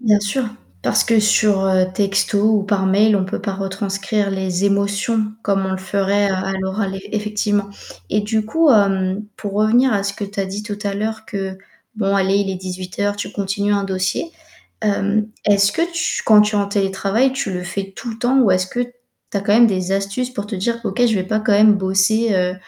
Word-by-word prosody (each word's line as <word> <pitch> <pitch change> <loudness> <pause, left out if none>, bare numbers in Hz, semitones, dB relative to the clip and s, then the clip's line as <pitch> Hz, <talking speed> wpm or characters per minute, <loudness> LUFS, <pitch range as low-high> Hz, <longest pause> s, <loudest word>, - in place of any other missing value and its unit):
Bien 215 -4 +3
sûr! 210 +6 -1 0.4
Parce - - +2
que 225 -1 +3
sur, 210 -1 +3
heu, 185 -1 +3
texto 195 0 +1 0.2
ou - - -2
par 200 -2 0
mail, 210 +3 +4
on 190 - 0
peut 190 - -4
pas 200 -1 -3
retranscrire 195 +1 -2
les 190 0 -1
émotions, 200 +2 0
comme 195 -1 0
on 190 - -2
le - - -1
ferait, 200 +1 0
heu, - - 0
à 190 +1 -2
l'oral 190 +1 -2
ef 190 - -8
effectivement. 210 -1 -1 0.4
Et 210 - +2
du 215 +1 -1
coup, 320 +8 +2
hem, 195 -2 +2
pour 205 -2 -6
revenir 230 +5 +3
à 200 -2 +1
ce 200 0 -2
que 205 - -5
tu 200 0 -5
as 195 - -1
dit 195 +2 -5
tout 205 -1 -5
à 200 -1 -1
l'heure 220 +2 -3
que, 195 -2 -4 0.4
bon 200 -2 0
allez 195 0 +2
il 200 -1 -1
est 190 - -3
18 185 0 -7
heures, 205 0 0
tu 205 - -5
continues 200 +1 -1
un 200 -1 +1
dossier. 190 - -2 0.5
Hem 210 0 0 0.2
est-ce 200 -1 +4
que 325 - 0
tu 335 -1 -1
quand 215 -2 +7
tu 210 0 0
es - - +3
en 200 - +1
télétravail, 200 +5 +1
tu 265 -7 -3
le 180 -1 -3
fais 195 +2 -5
tout 240 - -6
le 225 - -8
temps 255 +2 +2
ou 225 -6 +4
est-ce 185 0 +2
que 240 - -4
tu 245 -4 -8
as - - -4
quand 205 +1 +1
même 235 +1 +7
des 185 -2 -1
astuces 195 +6 -2
pour 205 -5 -5
te 205 -2 -5
dire: 235 +5 -2
«OK, 245 - -2
je 225 - +1
vais 190 - 0
pas 215 +3 -1
quand 215 - +1
même 210 +1 +6
bosser, 200 +3 +2
heu, 180 -1 +1
200 Hz, 230 wpm, -19 LUFS, 195-215 Hz, 0.5 s, quand